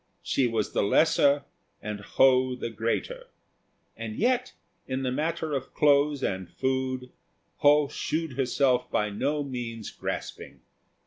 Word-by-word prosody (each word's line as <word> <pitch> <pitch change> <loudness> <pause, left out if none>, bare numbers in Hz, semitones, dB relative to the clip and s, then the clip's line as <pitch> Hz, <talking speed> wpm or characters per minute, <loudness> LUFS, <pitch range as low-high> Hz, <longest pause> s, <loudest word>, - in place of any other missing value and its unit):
She 130 - +1
was 115 -3 -1
the - - +1
lesser 145 +5 +3 0.4
and 105 0 -5
Ho 130 +4 +3
the 120 -2 -5
greater; 300 - -3 0.7
and 110 -1 -6
yet 250 +2 +1 0.3
in 130 0 -2
the 130 - 0
matter 155 +2 -2
of 135 -1 -4
clothes 145 -1 +3
and 95 -2 -2
food 130 -1 -2 0.5
Ho 145 0 +5
shewed 160 +1 -3
herself 125 -1 +1
by 105 0 0
no 145 +8 -1
means 120 -5 -5
grasping. - - -6
130 Hz, 130 wpm, -27 LUFS, 115-145 Hz, 0.7 s, Ho